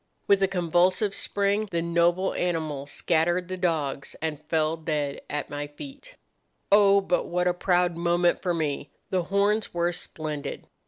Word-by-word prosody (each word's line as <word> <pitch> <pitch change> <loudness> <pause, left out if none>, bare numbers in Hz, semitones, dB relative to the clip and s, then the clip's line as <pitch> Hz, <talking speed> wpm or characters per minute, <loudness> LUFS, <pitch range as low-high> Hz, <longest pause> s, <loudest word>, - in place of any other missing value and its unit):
With 200 -1 +4
a 195 - +4
convulsive 185 +3 +2
spring 205 +2 0
the 170 -2 -1
noble 170 +2 +2
animal 155 -5 -2
scattered 175 +4 0
the 185 - -2
dogs 160 -7 -2
and 155 -2 -3
fell 160 0 +1
dead 150 -3 -3
at 150 0 -4
my 145 0 -4
feet. 280 - -11 0.6
"Oh, 200 -1 +6
but 180 -2 0
what 180 +1 0
a 180 - +3
proud 180 -1 +1
moment 175 +1 +2
for 175 -2 0
me! 150 -3 -2 0.2
The 185 -3 0
horns 200 +2 +1
were 175 0 +1
splendid. 155 -4 -5
175 Hz, 155 wpm, -26 LUFS, 155-190 Hz, 0.6 s, Oh